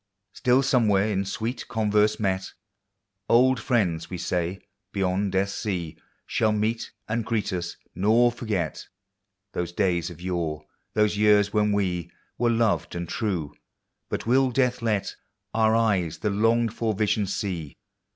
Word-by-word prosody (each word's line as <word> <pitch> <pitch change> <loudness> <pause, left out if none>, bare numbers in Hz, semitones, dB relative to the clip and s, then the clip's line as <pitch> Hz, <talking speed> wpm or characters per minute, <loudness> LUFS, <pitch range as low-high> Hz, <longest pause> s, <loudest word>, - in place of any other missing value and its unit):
Still 125 +2 +3
somewhere 110 -7 +3
in 100 -2 0
sweet 110 +6 -4
converse 105 -2 +2
met. 95 -2 -1 0.8
Old 125 +1 +5
friends, 95 - 0
we 90 - -4
sav, 90 +2 -1 0.3
bevond 95 +1 0
death's 95 +1 0
sea 90 -7 -3 0.3
Shall 110 - +1
meet 110 +2 -1 0.2
and 115 +1 -1
greet 110 -3 -1
us, 85 -1 -4 0.2
nor 115 +5 +4
forget 105 - -3 0.7
Those 85 -1 -2
days 90 -3 0
of 85 -2 -11
yore, 85 -4 -3 0.3
those 105 -1 +2
years 105 -1 +4
when 105 -1 +2
we 90 -4 -1 0.3
Were 120 0 +3
loved 115 -5 +1
and 85 0 -3
true,— 90 -8 -2 0.6
but - - -3
will 130 +3 +4
death 125 -1 +1
let 110 -4 -1 0.4
Our 110 0 +3
eyes 95 -8 +1
the 105 +5 -1
longed 115 +2 +2
for 115 -2 -1
vision 105 0 +1
see? 90 -6 -4
105 Hz, 140 wpm, -25 LUFS, 90-115 Hz, 0.8 s, Old